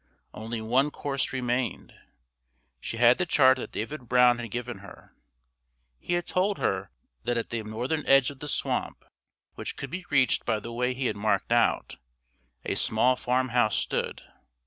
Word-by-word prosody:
Only 110 Hz, +1 st, -5 dB
one 130 Hz, +6 st, +2 dB
course 140 Hz, -3 st, -3 dB
remained. 125 Hz, -3 st, -2 dB, 0.9 s
She 115 Hz, -, -5 dB
had 120 Hz, +5 st, +5 dB
the 180 Hz, -, 0 dB
chart 130 Hz, -4 st, +5 dB
that -, -, -6 dB
David 125 Hz, +1 st, -5 dB
Brown 125 Hz, -1 st, +5 dB
had 120 Hz, -1 st, -5 dB
given 120 Hz, 0 st, -5 dB
her. 100 Hz, -, -14 dB, 0.8 s
He 175 Hz, -, -3 dB
had 175 Hz, 0 st, 0 dB
told 195 Hz, +2 st, 0 dB
her 95 Hz, 0 st, -1 dB, 0.4 s
that 120 Hz, -, 0 dB
at 115 Hz, -, -3 dB
that 115 Hz, -2 st, -3 dB
northern 125 Hz, +8 st, -2 dB
edge 135 Hz, 0 st, +5 dB
of 140 Hz, -, -14 dB
the 150 Hz, -, -6 dB
swamp, -, -, -2 dB, 0.5 s
which -, -, -6 dB
could 140 Hz, -, -6 dB
be 185 Hz, 0 st, -6 dB
reached 135 Hz, -2 st, +3 dB
by 110 Hz, -2 st, 0 dB
the 115 Hz, +3 st, -8 dB
way 125 Hz, +1 st, -1 dB
he 130 Hz, +1 st, -3 dB
had 115 Hz, -, -1 dB
marked 100 Hz, 0 st, 0 dB
out, 120 Hz, -1 st, +2 dB, 0.7 s
a -, -, -1 dB
small 120 Hz, +4 st, +2 dB
farmhouse 125 Hz, -3 st, +1 dB
stood. -, -, -2 dB
125 Hz, 170 wpm, -27 LUFS, 115-135 Hz, 0.9 s, had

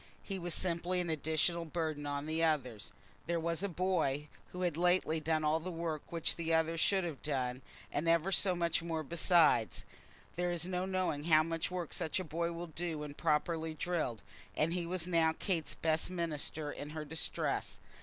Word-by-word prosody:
He 195 Hz, -2 st, -4 dB
was 175 Hz, -2 st, -1 dB
simply 180 Hz, 0 st, 0 dB
an 175 Hz, -2 st, -1 dB
additional 160 Hz, +2 st, +1 dB
burden 155 Hz, -3 st, -2 dB
on 145 Hz, 0 st, -2 dB
the 160 Hz, +1 st, 0 dB
others. 125 Hz, -9 st, 0 dB, 0.4 s
There 170 Hz, 0 st, +1 dB
was 165 Hz, +1 st, -1 dB
a 200 Hz, -, -1 dB
boy 160 Hz, -6 st, 0 dB, 0.2 s
who 180 Hz, 0 st, -4 dB
had 175 Hz, -4 st, +1 dB
lately 175 Hz, -1 st, +3 dB
done 155 Hz, 0 st, +1 dB
all 155 Hz, +1 st, +3 dB
the 175 Hz, +3 st, -5 dB
work 165 Hz, -3 st, -4 dB
which 165 Hz, -2 st, +1 dB
the 165 Hz, -1 st, +1 dB
other 160 Hz, 0 st, +2 dB
should 190 Hz, +3 st, +3 dB
have 165 Hz, -5 st, -4 dB
done, 130 Hz, -3 st, -1 dB, 0.3 s
and 160 Hz, +3 st, 0 dB
ever 170 Hz, +3 st, +3 dB
so 185 Hz, -1 st, +3 dB
much 170 Hz, -1 st, +1 dB
more 165 Hz, -2 st, -2 dB
beside. 160 Hz, -6 st, +4 dB, 0.7 s
There 175 Hz, 0 st, +1 dB
is 175 Hz, -1 st, -1 dB
no 180 Hz, 0 st, -1 dB
knowing 185 Hz, -6 st, -1 dB
how 155 Hz, -2 st, +6 dB
much 165 Hz, 0 st, -2 dB
work 180 Hz, -3 st, -4 dB
such 160 Hz, -, -1 dB
a -, -, -2 dB
boy 170 Hz, +1 st, -1 dB
will 170 Hz, +1 st, -5 dB
do 165 Hz, 0 st, -4 dB
when 150 Hz, -1 st, -5 dB
properly 160 Hz, +1 st, 0 dB
drilled, 155 Hz, -, -2 dB, 0.3 s
and 160 Hz, +2 st, +2 dB
he 175 Hz, -1 st, -2 dB
was 180 Hz, -1 st, 0 dB
now 165 Hz, -2 st, +3 dB
Kate's 170 Hz, -6 st, -1 dB
best 160 Hz, +1 st, +1 dB
minister 160 Hz, -3 st, -2 dB
in 145 Hz, -, -6 dB
her 155 Hz, -, -3 dB
distress. 160 Hz, +2 st, -1 dB
165 Hz, 190 wpm, -34 LUFS, 155-175 Hz, 0.7 s, how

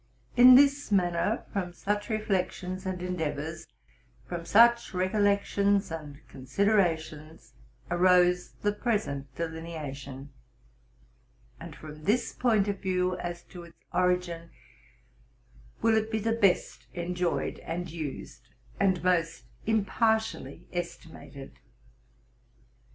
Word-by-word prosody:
Tn 250 Hz, +1 st, +9 dB
this 280 Hz, -1 st, +4 dB
manner, 175 Hz, -3 st, +1 dB
from 180 Hz, -3 st, -2 dB
such 205 Hz, +3 st, -2 dB
reflections 190 Hz, -3 st, -2 dB
and 180 Hz, -1 st, -3 dB
endeavors, 160 Hz, -2 st, -4 dB, 0.6 s
from 170 Hz, -1 st, -5 dB
such 235 Hz, -1 st, +5 dB
recollections 200 Hz, 0 st, +1 dB
and 150 Hz, -3 st, -8 dB
considerations, 160 Hz, -, -1 dB, 0.4 s
arose 180 Hz, 0 st, +3 dB
the 205 Hz, -, +3 dB
present 205 Hz, -, -2 dB
deline 160 Hz, 0 st, -5 dB
ation; 140 Hz, -1 st, -8 dB, 1.3 s
and -, -, -9 dB
from 155 Hz, 0 st, -11 dB
this 235 Hz, +3 st, +1 dB
point 220 Hz, -5 st, +2 dB
of 200 Hz, -1 st, -2 dB
view, 185 Hz, -1 st, 0 dB
as 175 Hz, -1 st, -5 dB
to 180 Hz, -, -11 dB
its 170 Hz, -1 st, -15 dB, 0.2 s
origin, 180 Hz, -2 st, 0 dB, 1.3 s
will 225 Hz, -1 st, +4 dB
it 220 Hz, 0 st, +1 dB
be 220 Hz, -, -1 dB
the 225 Hz, +1 st, -1 dB
best 205 Hz, -5 st, +1 dB
enjoyed 175 Hz, 0 st, -2 dB
and 175 Hz, 0 st, -5 dB
used, 155 Hz, -4 st, -7 dB, 0.3 s
and 190 Hz, -4 st, +2 dB
most 175 Hz, -2 st, +1 dB, 0.2 s
impartially 220 Hz, -, 0 dB
estimated. 160 Hz, -5 st, -7 dB
180 Hz, 105 wpm, -28 LUFS, 165-205 Hz, 1.3 s, Tn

